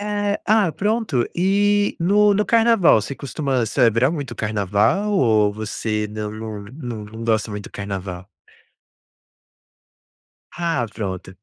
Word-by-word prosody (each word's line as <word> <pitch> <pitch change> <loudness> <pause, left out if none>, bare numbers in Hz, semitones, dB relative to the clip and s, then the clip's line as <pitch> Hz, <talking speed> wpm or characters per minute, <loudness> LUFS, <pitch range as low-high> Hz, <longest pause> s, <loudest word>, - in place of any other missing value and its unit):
É, 205 0 -1
ah, 215 -4 +3
pronto. 205 - 0
E, 205 +3 +2
no 205 +4 +4
no 210 +1 +1
carnaval, 225 - +4
você 140 - -5
costuma 135 -4 -2
celebrar 120 +1 +3
muito 145 -5 -5
o - - -9
carnaval, 105 - +1
ou 110 - +3
você 110 0 -3
não 105 0 -5
não 110 -1 -7
não 120 -7 -6
não 110 +2 -9
gosta 110 -1 0
muito 105 -1 -6
do - - -10
carnaval? 95 -2 -6 2.3
Ah, 165 -8 -1
pronto. 95 -3 -5
120 Hz, 130 wpm, -21 LUFS, -, 2.3 s, no